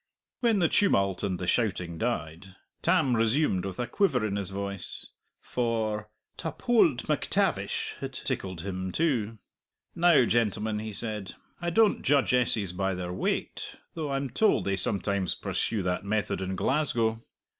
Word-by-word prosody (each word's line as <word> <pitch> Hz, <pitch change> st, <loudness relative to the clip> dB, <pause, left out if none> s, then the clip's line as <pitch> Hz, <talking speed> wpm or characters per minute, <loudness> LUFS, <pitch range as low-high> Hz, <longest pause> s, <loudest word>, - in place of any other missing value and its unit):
When 230 Hz, -4 st, +3 dB
the 175 Hz, -3 st, +4 dB
tumult 100 Hz, -, +2 dB
and 95 Hz, -3 st, -1 dB
the 90 Hz, -, -4 dB
shouting 90 Hz, -5 st, 0 dB
died, 95 Hz, -6 st, -3 dB, 0.3 s
Tam 155 Hz, -8 st, +3 dB
resumed 115 Hz, -, +2 dB
with 95 Hz, -2 st, -6 dB
a 125 Hz, -, 0 dB
quiver 125 Hz, -, +1 dB
in 100 Hz, -2 st, -2 dB
his 100 Hz, -2 st, -2 dB
voice, 100 Hz, -1 st, -5 dB, 0.3 s
for 110 Hz, -3 st, -2 dB, 0.3 s
"ta -, -, -3 dB
pold 170 Hz, -, +2 dB
MacTavish" -, -, 0 dB
had -, -, -5 dB
tickled 95 Hz, -4 st, -4 dB
him 95 Hz, 0 st, -4 dB
too. 115 Hz, -, 0 dB, 0.6 s
"Now, 170 Hz, -7 st, +5 dB
gentlemen," 110 Hz, -2 st, 0 dB
he 110 Hz, 0 st, -5 dB
said, 105 Hz, -2 st, -3 dB, 0.3 s
"I 175 Hz, -, -1 dB
don't 215 Hz, +4 st, +3 dB
judge 140 Hz, -2 st, +2 dB
essays 110 Hz, -7 st, +2 dB
by 95 Hz, +1 st, -1 dB
their 90 Hz, -1 st, -4 dB
weight, 90 Hz, -, -2 dB, 0.2 s
though 155 Hz, -3 st, -4 dB
I'm 135 Hz, -2 st, -2 dB
told 220 Hz, -, +2 dB
they 100 Hz, -, +1 dB
sometimes 100 Hz, -1 st, +2 dB
pursue 110 Hz, -4 st, -2 dB
that 90 Hz, +1 st, -1 dB
method 100 Hz, -1 st, -1 dB
in 95 Hz, 0 st, -3 dB
Glasgow!" 115 Hz, -3 st, 0 dB
110 Hz, 150 wpm, -28 LUFS, 95-130 Hz, 0.6 s, Now